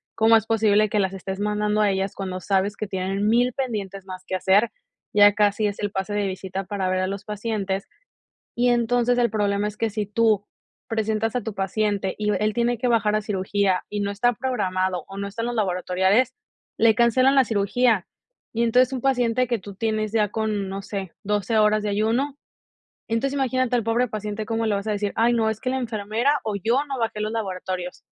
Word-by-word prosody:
¿cómo 225 +1 +5
es 220 -2 +3
posible 215 -1 +3
que 210 - +1
las 190 -1 0
estés 190 0 -5
mandando 210 0 0
a 210 - +4
ellas 190 0 -2
cuando 185 -2 -4
sabes 195 +2 0
que 215 - -4
tienen 195 +2 -1
1000 240 +3 +3
pendientes 200 -7 -4
más 185 -1 -8
que 185 - -3
hacer? 195 +5 +3 0.4
Ya 205 0 +7
casi 210 0 +2
es 205 - -4
el 205 -1 -2
pase 195 +1 -3
de 205 -1 0
visita 190 0 -4
para 190 -1 -2
ver 185 0 +1
a 185 - 0
los 200 +1 -5
pacientes". 210 -2 -3 0.7
Y 245 +1 +2
entonces 245 +1 +2
el 240 -1 +3
problema 205 -1 0
es 210 0 -7
que 225 0 0
si 210 0 -2
tú 210 -1 +2 0.4
presentas 220 0 -1
a 250 - +1
tu 220 0 -5
paciente 195 0 -1
y 210 0 -1
v - - +1
él 215 0 +1
tiene 240 +1 +1
que 245 +3 -1
bajar 220 -3 +2
a 215 - +1
cirugía 195 -2 0
y 210 - -3
no 200 0 -1
está 245 +4 +2
programado 185 -8 -1
o 195 - -9
no 200 0 -3
están 230 +3 -4
los 240 0 -2
laboratoriales, 190 +4 +1 0.4
le 225 -1 +5
cancelan 255 +3 +4
la 270 - +6
cirugía. 215 0 +1 0.5
Y 230 +1 +1
entonces 250 +3 +3
un 255 - -3
paciente 250 -2 +1
que 240 -1 0
tú 200 +1 -10
tienes 215 0 -1
ya 215 -2 +2
con, 210 -2 -2
no 195 +1 -4
sé, 195 -3 -5
12 210 +2 0
horas 215 0 +4
de 210 - -1
ayuno. 230 +8 0 0.7
Entonces 240 +5 0
imagínate 255 -2 0
al 235 - +1
pobre 230 +3 +1
paciente 215 0 -4
como 225 +1 -1
le 210 - +1
vas 200 +1 -3
a - - 0
decir: 205 -1 -1
"Ay, 235 +2 +3
no, 225 -2 +2
es 220 - -3
que 255 - -2
la 265 - 0
enfermera 235 +4 0
o 215 -2 -2
yo 230 +8 +1
no 270 -3 -4
bajé 220 -2 -2
los 215 0 -2
laboratorios". 185 -4 -4
210 Hz, 215 wpm, -24 LUFS, 200-230 Hz, 0.7 s, Ya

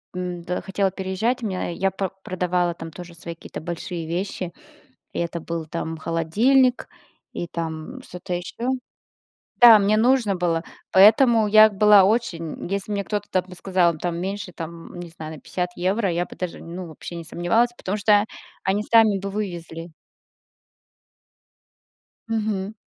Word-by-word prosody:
м-да, 180 -1 -3
хотела 195 0 0
переезжать, 195 +7 -2
меня 190 -5 -2
я 190 +3 0
по 195 -1 -2
продавала 180 -1 0
там 165 -1 -8
тоже 175 +1 -10
свои 170 0 -7
какие-то - - -9
большие 170 0 -5
вещи, 180 0 -3 0.6
и - - -3
это 170 0 -2
был 165 0 -4
там 160 0 -4
холодильник 225 - +2 0.5
и 175 - -4
там 165 +10 -5
что-то 180 -3 -7
ещё. 230 +7 -4 0.9
Да, 235 -3 +10
мне 205 +1 +3
нужно 235 -3 +3
было. 170 -2 0 0.3
Поэтому 220 +3 +6
я 215 +1 +7
была 205 -1 +6
очень 185 -7 -1
если 200 +2 -2
мне 200 -1 -1
кто-то 210 0 -3
там 185 -1 +1
бы 180 - -10
сказал 180 -2 +1
там 170 +1 -3
меньше 190 0 -4
там, 165 0 -8
не 175 - -7
знаю, 160 -1 -8
на - - -14
50 180 -1 -3
евро, 190 +2 0
я 175 +1 -1
бы - - -13
даже, 180 -2 -4
ну, 175 +2 -7
вообще 160 +2 -9
не 170 - -7
сомневалась, 175 +9 +1
потому 195 -2 -3
что 210 0 +4 0.4
они 195 +2 +1
сами 220 -2 +4
бы 195 +1 -5
вывезли. 175 -5 -5 2.4
Мгм. 215 -2 -2
185 Hz, 150 wpm, -23 LUFS, 170-210 Hz, 2.4 s, Да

